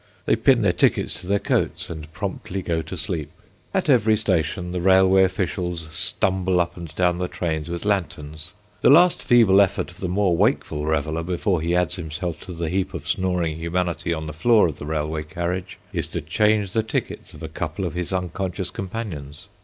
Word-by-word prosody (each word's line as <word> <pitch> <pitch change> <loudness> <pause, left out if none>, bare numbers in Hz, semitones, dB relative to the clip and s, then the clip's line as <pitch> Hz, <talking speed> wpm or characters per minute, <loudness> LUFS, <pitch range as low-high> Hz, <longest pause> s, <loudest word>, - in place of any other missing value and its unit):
They - - +3
pin 120 +1 +4
their 95 -3 +3
tickets - - +1
to 90 - -11
their 100 +1 +3
coats - - -1
and 80 -2 -8
promptly 95 +1 -4
go 85 -2 0
to 80 +4 -7
sleep. 75 -1 -3 0.4
At - - 0
every 110 -6 +4
station 90 -3 -1
the 90 -1 -2
railway 95 +1 +5
officials 90 -2 -2
stumble 95 +3 +1
up 85 - 0
and 85 -1 -7
down 90 -1 +2
the 90 - -1
trains 80 -3 -3
with 85 +3 -4
lanterns. 80 -5 -2 0.3
The - - +5
last 170 +5 +6
feeble 110 -6 +6
effort 100 - 0
of - - -17
the 95 - -2
more 95 -1 +2
wakeful 75 -2 +1
reveller, 80 +1 0
before 90 +1 0
he 85 +2 0
adds 90 +1 +1
himself 85 +1 -4
to 90 - -6
the 85 -1 -3
heap 95 +2 -1
of - - -7
snoring 90 -4 0
humanity 85 +1 -2
on 80 -1 -2
the 75 - -6
floor 110 +8 +4
of 80 -4 -3
the 75 - -6
railway 75 0 -2
carriage, 85 +4 -4 0.2
is - - -1
to - - -4
change 105 +5 +1
the 110 - +3
tickets 110 - -4
of - - -11
a - - -3
couple 80 +4 -4
of 85 - -3
his 90 0 -3
unconscious 90 0 -3
companions. 90 -9 -6
90 Hz, 195 wpm, -23 LUFS, 80-95 Hz, 0.4 s, last